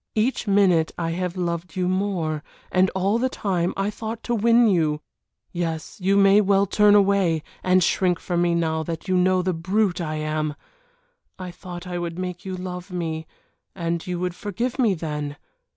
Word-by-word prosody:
Each 230 Hz, +2 st, 0 dB
minute 190 Hz, -5 st, +3 dB
I 165 Hz, -1 st, -1 dB
have 180 Hz, +1 st, -3 dB
loved 170 Hz, -1 st, -3 dB
you 180 Hz, -1 st, 0 dB
more 185 Hz, -5 st, -1 dB, 0.3 s
and 185 Hz, 0 st, +4 dB
all 195 Hz, +4 st, +1 dB
the 260 Hz, +2 st, +1 dB
time 180 Hz, -7 st, -1 dB
I 195 Hz, +2 st, 0 dB
thought 220 Hz, +1 st, -6 dB
to 240 Hz, -, -1 dB
win 235 Hz, +1 st, +4 dB
you. 160 Hz, -6 st, +2 dB, 0.5 s
Yes, 165 Hz, +2 st, -4 dB
you 195 Hz, +2 st, +3 dB
may 200 Hz, +1 st, +6 dB
well 200 Hz, 0 st, +3 dB
turn 205 Hz, +1 st, +4 dB
away, 195 Hz, -6 st, +3 dB, 0.2 s
and 185 Hz, 0 st, +3 dB
shrink 180 Hz, 0 st, +2 dB
from 175 Hz, -1 st, -1 dB
me 175 Hz, -1 st, +2 dB
now 160 Hz, -1 st, 0 dB
that 165 Hz, +3 st, -5 dB
you 185 Hz, -, +1 dB
know 185 Hz, 0 st, +3 dB
the 185 Hz, 0 st, 0 dB
brute 185 Hz, +3 st, 0 dB
I 155 Hz, -2 st, -3 dB
am. 155 Hz, -1 st, -2 dB, 0.8 s
I 185 Hz, -2 st, -6 dB
thought 175 Hz, 0 st, -9 dB
I 180 Hz, -1 st, -4 dB
would 170 Hz, -1 st, -4 dB
make 180 Hz, 0 st, -5 dB
you 190 Hz, -2 st, -5 dB
love 180 Hz, 0 st, -6 dB
me, 160 Hz, -3 st, -4 dB, 0.5 s
and 170 Hz, -2 st, -2 dB
you 180 Hz, -1 st, -2 dB
would 180 Hz, 0 st, -2 dB
forgive 230 Hz, +8 st, -3 dB
me 220 Hz, -7 st, +3 dB
then. 150 Hz, -3 st, -4 dB
180 Hz, 185 wpm, -23 LUFS, 170-200 Hz, 0.8 s, may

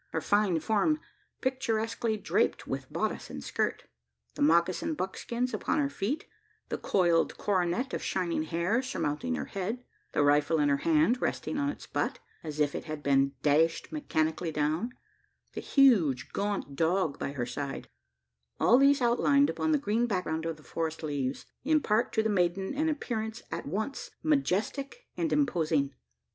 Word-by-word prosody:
Her -, -, +1 dB
fine 205 Hz, -5 st, +2 dB
form 220 Hz, -, +2 dB, 0.4 s
picturesquely 230 Hz, -3 st, -1 dB
draped 205 Hz, -, 0 dB
with -, -, -5 dB
bodice -, -, -2 dB
and -, -, -7 dB
skirt; -, -, -1 dB, 0.5 s
the -, -, -7 dB
moccasin 170 Hz, -, +3 dB
buskins 240 Hz, +3 st, -3 dB
upon 215 Hz, -, 0 dB
her 285 Hz, -2 st, +1 dB
feet; 270 Hz, +10 st, -2 dB, 0.4 s
the -, -, -3 dB
coiled 170 Hz, -3 st, +2 dB
coronet 190 Hz, +5 st, 0 dB
of -, -, -2 dB
shining 175 Hz, -4 st, -1 dB
hair 170 Hz, +9 st, 0 dB
surmounting 150 Hz, -, -2 dB
her 75 Hz, -, -3 dB
head; 215 Hz, +6 st, -4 dB, 0.3 s
the -, -, +3 dB
rifle 145 Hz, +2 st, +3 dB
in 145 Hz, -1 st, +3 dB
her 140 Hz, -, +3 dB
hand, 165 Hz, -, +3 dB
resting 295 Hz, -, -1 dB
on 285 Hz, 0 st, +1 dB
its 285 Hz, -, -6 dB
butt, -, -, -2 dB, 0.3 s
as 155 Hz, -2 st, -6 dB
it 145 Hz, -1 st, 0 dB
had 155 Hz, -1 st, -6 dB
been 135 Hz, 0 st, +3 dB
dashed 155 Hz, +3 st, +2 dB
mechanically 160 Hz, -, -1 dB
down; 155 Hz, +11 st, -1 dB, 0.6 s
the -, -, -4 dB
huge 185 Hz, -, +4 dB
gaunt 200 Hz, -8 st, -2 dB
dog 165 Hz, 0 st, +1 dB
by 140 Hz, -, -3 dB
her 125 Hz, -3 st, -2 dB
side 135 Hz, +3 st, -5 dB, 0.7 s
all 245 Hz, -, +6 dB
these 275 Hz, -1 st, +5 dB
outlined 280 Hz, +4 st, +4 dB
upon 315 Hz, -, -1 dB
the 305 Hz, -, +4 dB
green 240 Hz, -3 st, 0 dB
background 165 Hz, -6 st, -1 dB
of 165 Hz, -1 st, -3 dB
the 155 Hz, -, -17 dB
forest 160 Hz, 0 st, -3 dB
leaves, 140 Hz, -3 st, -2 dB, 0.2 s
impart 255 Hz, -6 st, +2 dB
to 220 Hz, -, +1 dB
the -, -, +1 dB
maiden 190 Hz, 0 st, +1 dB
an 310 Hz, +3 st, +1 dB
appearance 225 Hz, -6 st, -3 dB
at -, -, -4 dB
once 220 Hz, -, -3 dB
majestic 275 Hz, -, 0 dB
and 330 Hz, -2 st, -1 dB
imposing. 160 Hz, -, +1 dB
190 Hz, 155 wpm, -29 LUFS, 155-250 Hz, 0.7 s, all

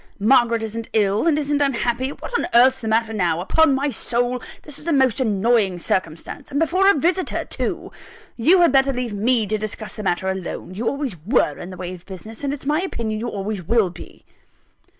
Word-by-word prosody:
Margaret 230 Hz, +1 st, +3 dB
isn't 225 Hz, +1 st, -5 dB
ill, 210 Hz, +5 st, +2 dB
and 310 Hz, -3 st, +3 dB
isn't 290 Hz, -1 st, 0 dB
unhappy 250 Hz, -1 st, 0 dB
what 290 Hz, -, -9 dB
on -, -, 0 dB
earth's 260 Hz, +2 st, +6 dB
the 225 Hz, -, -4 dB
matter 225 Hz, 0 st, +1 dB
now? 175 Hz, -6 st, 0 dB
Upon 280 Hz, -, +3 dB
my 280 Hz, +2 st, 0 dB
soul 245 Hz, +1 st, -1 dB, 0.2 s
this 295 Hz, -2 st, -6 dB
is 300 Hz, -, -10 dB
a -, -, +1 dB
most 265 Hz, -5 st, +3 dB
annoying 215 Hz, -4 st, +2 dB
circumstance: 170 Hz, -, -3 dB
and 285 Hz, -, -1 dB
before 365 Hz, +5 st, +3 dB
a -, -, +5 dB
visitor 350 Hz, +6 st, 0 dB
too! -, -, -4 dB, 0.4 s
You 335 Hz, +10 st, +4 dB
had 340 Hz, -, +5 dB
better 270 Hz, 0 st, +4 dB
leave 245 Hz, -3 st, -3 dB
me 225 Hz, +2 st, +1 dB
to 215 Hz, +1 st, -2 dB
discuss 215 Hz, 0 st, -5 dB
the -, -, -4 dB
matter 190 Hz, -1 st, -1 dB
alone 190 Hz, -1 st, -4 dB
you 225 Hz, +5 st, -3 dB
always 275 Hz, -, -2 dB
were 195 Hz, -, +1 dB
in 175 Hz, -, -7 dB
the 185 Hz, -, -9 dB
way 180 Hz, 0 st, -5 dB
of 180 Hz, 0 st, -13 dB
business, 215 Hz, +6 st, -9 dB
and 280 Hz, -, -1 dB
it's 285 Hz, -1 st, -6 dB
my 300 Hz, +4 st, +1 dB
opinion 225 Hz, -, -3 dB
you 235 Hz, -, -3 dB
always 200 Hz, -1 st, -4 dB
will 205 Hz, +1 st, +1 dB
be." 170 Hz, -, -13 dB
235 Hz, 210 wpm, -21 LUFS, 205-275 Hz, 0.4 s, earth's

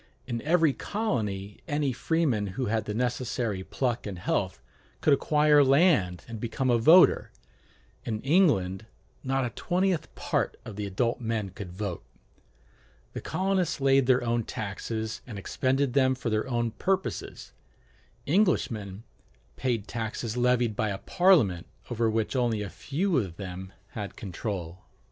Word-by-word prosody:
In 120 Hz, -2 st, -3 dB
every 160 Hz, -1 st, +3 dB
colony 105 Hz, -, -3 dB
any 145 Hz, -4 st, 0 dB
freeman 130 Hz, -7 st, 0 dB
who 130 Hz, -, 0 dB
had 110 Hz, 0 st, 0 dB
the 105 Hz, -, -3 dB
necessary 120 Hz, -4 st, -1 dB
pluck 120 Hz, +1 st, -2 dB
and 95 Hz, -3 st, -5 dB
health 85 Hz, -, -1 dB, 0.4 s
could 150 Hz, -, +4 dB
acquire 150 Hz, +1 st, +4 dB
land 135 Hz, -, +3 dB
and 115 Hz, -2 st, -7 dB
become 120 Hz, +3 st, -1 dB
a 120 Hz, -, +3 dB
voter: 165 Hz, +10 st, +6 dB, 0.7 s
in 110 Hz, -2 st, -3 dB
England 120 Hz, -, +2 dB, 0.4 s
not 135 Hz, 0 st, 0 dB
a 120 Hz, -, -3 dB
twentieth 180 Hz, -, -1 dB
part -, -, -1 dB
of 110 Hz, -, -8 dB
the 105 Hz, 0 st, -3 dB
adult 115 Hz, +5 st, -1 dB
men 110 Hz, -4 st, -2 dB
could 90 Hz, -1 st, -8 dB
vote. 95 Hz, -1 st, -4 dB, 1.1 s
The -, -, -5 dB
colonists 185 Hz, -4 st, 0 dB
laid 135 Hz, -1 st, +4 dB
their 130 Hz, -1 st, +4 dB
own 120 Hz, 0 st, 0 dB
taxes 110 Hz, +2 st, -4 dB
and 110 Hz, -5 st, -7 dB
expended 130 Hz, +6 st, 0 dB
them 130 Hz, -1 st, +3 dB
for 120 Hz, -2 st, -3 dB
their 110 Hz, +4 st, 0 dB
own 120 Hz, -2 st, 0 dB
purposes: 190 Hz, -, -3 dB, 0.7 s
Englishmen 115 Hz, -, +1 dB, 0.5 s
paid 120 Hz, -5 st, -1 dB
taxes 115 Hz, 0 st, -4 dB
levied 125 Hz, -2 st, +2 dB
by 110 Hz, -, 0 dB
a 100 Hz, -, -2 dB
Parliament 140 Hz, -, +3 dB, 0.2 s
over 115 Hz, -1 st, +1 dB
which 110 Hz, +3 st, -1 dB
only 120 Hz, -4 st, +1 dB
a 100 Hz, -, -6 dB
few 165 Hz, +2 st, 0 dB
of 90 Hz, -7 st, -5 dB
them 95 Hz, -1 st, -7 dB, 0.2 s
had 105 Hz, -2 st, -6 dB
control. 90 Hz, -3 st, -5 dB
120 Hz, 145 wpm, -28 LUFS, 105-140 Hz, 1.1 s, voter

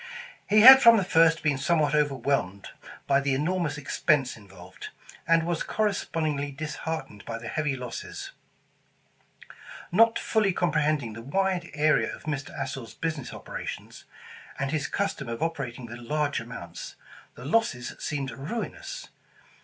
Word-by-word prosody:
He 215 Hz, +1 st, +6 dB
had 265 Hz, +3 st, +11 dB
from 230 Hz, -2 st, +8 dB
the 195 Hz, -, +2 dB
first 165 Hz, -2 st, +3 dB
been 145 Hz, -3 st, +1 dB
somewhat 155 Hz, 0 st, +2 dB
overwhelmed 135 Hz, -9 st, 0 dB, 0.4 s
by 140 Hz, 0 st, +3 dB
the 140 Hz, -1 st, 0 dB
enormous 155 Hz, 0 st, -1 dB
expense 145 Hz, -1 st, +1 dB
involved, 95 Hz, -3 st, -12 dB, 0.4 s
and 165 Hz, 0 st, +4 dB
was 170 Hz, -1 st, -1 dB
corres 210 Hz, -2 st, 0 dB
pondingly 145 Hz, -4 st, -2 dB
disheartened 155 Hz, -7 st, -5 dB
by 115 Hz, -, -5 dB
the 115 Hz, 0 st, -8 dB
heavy 150 Hz, +2 st, -1 dB
losses. 125 Hz, -3 st, -7 dB, 1.6 s
Not 225 Hz, +5 st, +5 dB
fully 210 Hz, -4 st, +1 dB
comprehending 150 Hz, -8 st, 0 dB
the 115 Hz, -, -8 dB
wide 180 Hz, +6 st, -1 dB
area 155 Hz, +1 st, +2 dB
of -, -, -16 dB
Mr. 145 Hz, -2 st, -4 dB
Astor's 130 Hz, -4 st, -5 dB
business 155 Hz, -6 st, -4 dB
operations, -, -, -8 dB, 0.5 s
and 140 Hz, 0 st, -2 dB
his 150 Hz, -2 st, -1 dB
custom 150 Hz, -10 st, -2 dB
of 115 Hz, +6 st, -3 dB
operating 135 Hz, -7 st, -4 dB
with 120 Hz, +1 st, -9 dB
large 145 Hz, +4 st, -1 dB
amounts, 115 Hz, -8 st, -8 dB, 0.4 s
the 125 Hz, -, -10 dB
losses 145 Hz, -, 0 dB
seemed 140 Hz, -2 st, -3 dB
ruinous. 390 Hz, -, -6 dB
150 Hz, 135 wpm, -27 LUFS, 130-170 Hz, 1.6 s, had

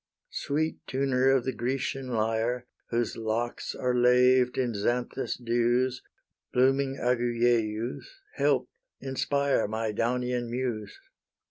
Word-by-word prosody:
Sweet 155 Hz, +2 st, -1 dB
tuner 130 Hz, -1 st, +2 dB
of 135 Hz, -2 st, +3 dB
the 130 Hz, -, 0 dB
Grecian 130 Hz, +2 st, -2 dB
lyre, 115 Hz, +1 st, 0 dB, 0.2 s
Whose 120 Hz, -1 st, -1 dB
locks 115 Hz, +2 st, -2 dB
are 125 Hz, -1 st, 0 dB
laved 125 Hz, +1 st, +4 dB
in 125 Hz, -3 st, 0 dB
Xanthus' 120 Hz, +5 st, -1 dB
dews, 120 Hz, +1 st, +1 dB, 0.5 s
Blooming 135 Hz, +2 st, +2 dB
Agyieus! 120 Hz, -2 st, 0 dB, 0.3 s
help, -, -, +2 dB, 0.3 s
inspire 140 Hz, -1 st, 0 dB
My 110 Hz, +1 st, -2 dB
Daunian 125 Hz, +2 st, -1 dB
Muse! 120 Hz, -, -3 dB
125 Hz, 105 wpm, -28 LUFS, 115-130 Hz, 0.5 s, laved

